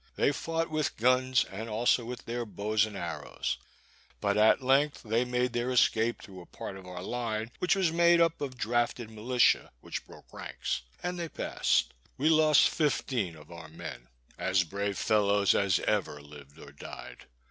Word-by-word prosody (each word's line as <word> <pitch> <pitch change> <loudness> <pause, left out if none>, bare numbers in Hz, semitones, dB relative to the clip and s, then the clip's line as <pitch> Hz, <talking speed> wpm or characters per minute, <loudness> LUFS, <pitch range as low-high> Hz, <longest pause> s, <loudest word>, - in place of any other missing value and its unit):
They - - +3
fought 165 +2 -2
with 155 -2 -1
guns, 130 +2 +3
and 110 +4 -7
also 115 +2 +2
with 125 0 -7
their 120 +1 -3
bows 105 0 0
and 105 -2 -8
arrows; - - -4 0.6
but 100 0 0
at 110 +5 +4
length 140 +3 +2
they 115 +2 +1
made 125 0 -1
their 120 +1 -1
escape 120 -2 +2
through 95 -2 -11
a 85 - -14
part 95 - -7
of 95 -1 -11
our 90 0 -7
line, 115 0 -3
which 180 - +2
was 185 -4 +2
made 170 +1 +5
up 165 -2 +2
of 130 -3 -4
drafted 120 -1 -1
militia, 115 +1 +2
which - - -6
broke - - -16
ranks, - - -4 0.2
and 180 0 -3
they 170 -1 -3
passed. - - 0 0.2
We 150 +4 +2
lost 155 -2 +6
fifteen 130 - -1
of 75 +1 -15
our 80 -2 -9
men, 80 -6 -9 0.3
as 95 0 +2
brave 100 +2 -3
fellows 100 -2 +3
as 100 -2 +2
ever 100 -8 -1
lived 75 0 -14
or 70 -3 -12
died. 70 - -10
115 Hz, 175 wpm, -29 LUFS, 100-130 Hz, 0.6 s, lost